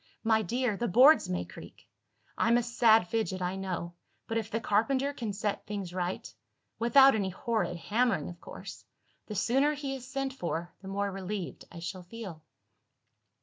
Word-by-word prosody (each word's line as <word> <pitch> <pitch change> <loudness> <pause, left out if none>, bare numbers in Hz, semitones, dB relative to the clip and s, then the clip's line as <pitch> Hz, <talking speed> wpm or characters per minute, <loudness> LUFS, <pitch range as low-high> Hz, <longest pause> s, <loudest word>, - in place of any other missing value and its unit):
My 220 -1 +3
dear, 240 +2 0
the 240 - -1
boards 260 - +6
may 90 -1 -1
creak! - - -13 0.5
I'm 235 +2 +3
a 240 - +1
sad 225 -4 +4
fidget, 215 -3 -1
I 180 +1 -2
know; 180 -3 -4 0.3
but, 225 0 -1
if 220 -1 -6
the 225 - -1
carpenter 260 +7 +1
can 230 -6 -4
set 205 +1 -3
things 200 -4 -4
right 180 0 -2 0.5
without 270 +4 +7
any 200 -3 0
horrid 215 -1 -1
hammering, 210 -4 +1
of 175 -1 -9
course! - - -9 0.4
the 210 - -5
sooner 270 +9 +2
he 280 -2 -4
is 255 -2 -7
sent 270 0 -2
for, 170 -7 -4
the 190 - -10
more 200 +1 -1
relieved 195 -1 -5
I 175 - -10
shall 175 +2 -5
feel." 180 -3 -8
215 Hz, 170 wpm, -30 LUFS, 185-240 Hz, 0.5 s, without